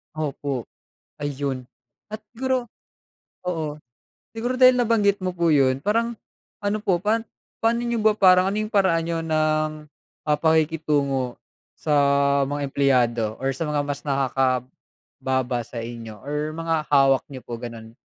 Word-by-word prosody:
Opo, 140 -4 -3 0.5
ayun 140 -2 -3 0.5
at 215 - -5 0.2
siguro 260 0 -1 0.8
oo, 160 -4 -2 0.6
siguro 240 +3 -2
dahil 255 0 +8
nabanggit 215 -5 +2
mo 185 - 0
po 170 -1 -1
yun, 130 -2 +3
parang 230 +4 +1 0.4
ano 205 +1 -1
po 185 -4 +2
pan, 215 +5 +1 0.4
pano 230 +1 +2
niyo 235 -2 -1
ba 215 0 +3
parang 185 -1 +6
ano 205 - -2
yung - - -11
paraan 190 -6 +3
niyo 170 -1 -1
ng 155 -1 0 0.4
mga 150 -1 +3
pakikitungo 150 -5 +1 0.4
sa 150 - 0 0.6
mga 145 0 -2
empleyado 120 -5 +1
or 135 +1 -1
sa 135 - -5
mga 150 -1 0
mas 145 0 -4
nakakababa 130 -1 -2
sa 115 +1 -9
inyo 115 -2 -8
or 150 +2 -3
mga 165 0 -1 0.2
hawak 135 -2 +5
niyo 130 -2 -8
po 120 - -5
ganon? 115 -1 -8
150 Hz, 140 wpm, -23 LUFS, 135-195 Hz, 0.8 s, dahil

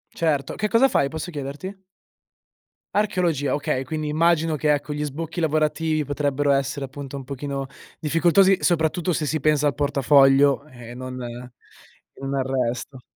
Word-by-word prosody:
Certo, 150 -4 0
che 210 - -1
cosa 230 +5 +4
fai? 140 - +2
Posso 160 +2 -5
chiederti? 145 +7 -6 1.2
Archeologia. 175 -10 +1
Okay, 135 -2 -1
quindi 155 +2 -3
immagino 160 +1 +2
che, 150 +1 +1
ecco, 145 0 -1
gli 150 0 -3
sbocchi 160 +4 -5
lavorativi 155 -1 0
potrebbero 145 0 0
essere, 135 0 0
appunto, 140 +1 -8
un 135 - -7
pochino 140 +1 -4 0.3
difficoltosi 175 +5 +4
soprattutto 170 +1 +1
se 155 - -1
si 155 +2 -1
pensa 150 0 +2
al 145 - +2
portafoglio 140 0 +4
e 120 -4 -11
non 130 0 -7
e 120 +1 -13
non 135 0 -3
al 135 - +1 0.2
resto. 125 +2 -6
145 Hz, 150 wpm, -23 LUFS, 135-160 Hz, 1.2 s, cosa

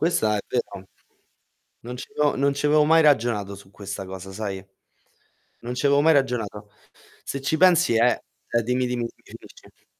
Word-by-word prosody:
Questa 110 -11 +1
è - - -1
vero. 110 -6 -4 1.0
Non 125 +1 -7
ci 125 - -8
avevo 150 -1 +1
non 140 +1 +1
ci 140 - -2
avevo 150 +1 +4
mai 160 +2 +5
ragionato 115 -8 +2
su 100 -1 -13
questa 100 0 -7
cosa, 95 0 -8
sai. 95 -2 -5 1.0
Non 120 +1 -5
ci 130 +3 0
avevo 140 0 +4
mai 160 +2 +5
ragionato. 110 -7 -1 0.5
Se 140 - -5
ci 135 +4 0
pensi 175 -5 +4
è 120 +2 +3 0.3
è 120 - +1
dimmi, 125 +2 0
dimmi, 120 -1 -2
finisci. - - -16
125 Hz, 170 wpm, -24 LUFS, 105-145 Hz, 1.0 s, mai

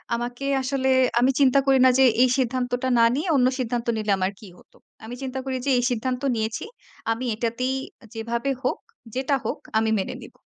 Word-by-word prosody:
আমাকে 245 +3 -5 0.2
আসলে, 265 0 -1 0.3
আমি 255 +2 +4
চিন্তা 275 0 +5
করি 270 -1 +4
না - - +7
যে 265 - +7 0.2
এই 255 - +5
সিদ্ধান্তটা 250 0 -1
না 230 - +6
নিয়ে 315 +6 -2
অন্য 255 -1 +4
সিদ্ধান্ত 240 -1 -2
নিলে 210 -1 -1
আমার 185 +1 0
কী 210 - -12
হত। - - -22 0.3
আমি 240 +2 -7
চিন্তা 265 0 -4
করি 260 -1 -2
যে 275 - +2
এই 245 - +1
সিদ্ধান্ত 250 +2 -2
নিয়েছি। 220 - -3 0.5
আমি 240 +3 -2
এটাতেই 245 +3 -1 0.4
যেভাবে 235 +4 -3
হোক, 255 - 0 0.4
যেটা 270 +2 +1
হোক, - - -3 0.2
আমি 220 0 +2
মেনে 190 - -4
নিব। - - -12
250 Hz, 190 wpm, -24 LUFS, 230-265 Hz, 0.5 s, না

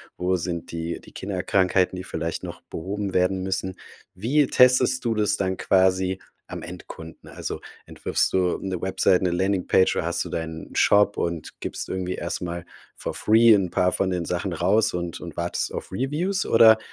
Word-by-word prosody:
wo 90 +1 0
sind 85 -1 -4
die 85 0 -4
die - - -16
Kinderkrankheiten, 95 -1 +1
die 90 - -5
vielleicht 80 -2 -4
noch - - -7
behoben 100 +3 -5
werden 95 +1 +2
müssen? 95 0 -2 0.4
Wie 130 +10 +2
testest 125 0 +4
du 115 -1 0
das 105 -1 +1
dann 95 -1 -1
quasi 95 0 +2 0.3
am - - -6
Endkunden? 80 0 -10
Also, - - -5 0.3
entwirfst - - -1
du 90 -1 +1
'ne 95 -2 -3
Website, 95 -1 +2
'ne 90 - +1
Landingpage 95 +1 +2
oder - - -1
hast - - -1
du - - -8
deinen 80 -1 -5
Shop 100 0 +4
und 85 -2 -4
gibst - - -5
irgendwie 90 -1 -2
erst 85 - -4
mal 85 -1 -4 0.3
for - - -5
free 115 +1 +5
'n 95 -3 +2
paar 90 +1 +2
von 95 - 0
den 90 -2 -1
Sachen 90 +2 -2
raus 95 +6 +2
und 85 -1 -4
und 85 -3 -8
wartest 85 0 -2
auf - - -6
Reviews 155 - -1
oder, 110 -1 +7
95 Hz, 175 wpm, -24 LUFS, 90-105 Hz, 0.4 s, oder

